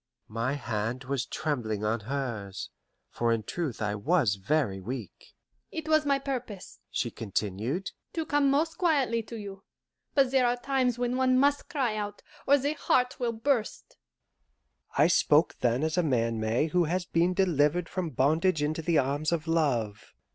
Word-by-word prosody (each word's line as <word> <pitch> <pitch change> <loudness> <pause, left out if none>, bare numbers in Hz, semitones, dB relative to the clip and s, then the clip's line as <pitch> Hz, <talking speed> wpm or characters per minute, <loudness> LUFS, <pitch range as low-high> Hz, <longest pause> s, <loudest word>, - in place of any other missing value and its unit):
My 115 +4 0
hand 120 -2 -3
was 135 0 -2
trembling 115 -9 -2
on 110 +2 0
hers, 110 -5 -4 0.4
for 120 0 0
in 115 -1 0
truth 145 - -3
I 105 -1 0
was 125 - +2
very 100 0 0
weak. 110 0 -8 0.4
"It 320 -1 -5
was 310 -1 +3
my 280 -1 +3
purpose," 250 -8 -6
she 120 - -2
continued, 110 - -3 0.2
"to 325 -1 -2
come 290 -2 +2
most 310 +4 +1
quietly 275 -10 +2
to 230 +1 -9
you; 200 -2 -8 0.5
but 270 -3 +4
there 260 -2 +4
are 240 +1 +1
times 255 -2 0
when 245 +1 -1
one 255 -1 +3
must 285 +2 +2
cry 255 -7 0
out, 205 -1 -5 0.2
or 285 - +6
the 285 +2 -1
heart 250 -4 +1
will 240 -2 0
burst." 230 0 -2 1.0
I 145 - +6
spoke 160 -1 +3
then 120 +3 +1
as 160 +2 +1
a - - +5
man 115 -7 0
may 110 +6 +1
who 180 +1 +2
has 175 +3 -1
been 175 +2 +1
delivered 170 -2 +2
from 185 -3 -3
bondage 155 +5 +2
into 155 +2 -1
the 165 0 +1
arms 145 +4 +1
of 170 -1 -1
love. 125 -11 -1
165 Hz, 170 wpm, -28 LUFS, -, 1.0 s, or